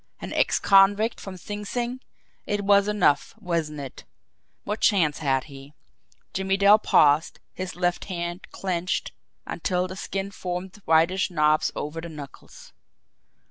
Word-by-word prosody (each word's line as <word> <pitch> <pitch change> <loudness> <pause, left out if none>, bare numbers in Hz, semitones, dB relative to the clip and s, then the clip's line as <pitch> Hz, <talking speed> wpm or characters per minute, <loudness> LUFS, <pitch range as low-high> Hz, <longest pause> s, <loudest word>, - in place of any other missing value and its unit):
An - - -6
ex - - +2
convict 200 +3 +4
from 190 -2 -8
Sing 205 +3 -6
Sing! 245 +4 -3 0.5
It 205 -1 -1
was 200 0 +5
enough, 205 -9 +2
wasn't 165 -7 -3
it? 135 -2 -9 0.6
What 210 +2 -3
chance 165 -8 +3
had 135 -4 +1
he!" 140 0 -13 0.6
Jimmie 190 +1 0
Dale 200 +2 +6
paused, 150 -5 +3
his 185 0 -6
left 175 0 -1
hand 175 -1 -5
clenched 180 -1 -2 0.3
until 180 -1 -1
the 185 - -8
skin 195 +1 -4
formed 180 0 -5
whitish 165 +5 +3
knobs 155 -3 +2
over 150 +2 -4
the 170 - -7
knuckles. 145 -3 -12
180 Hz, 140 wpm, -25 LUFS, 160-200 Hz, 0.6 s, Dale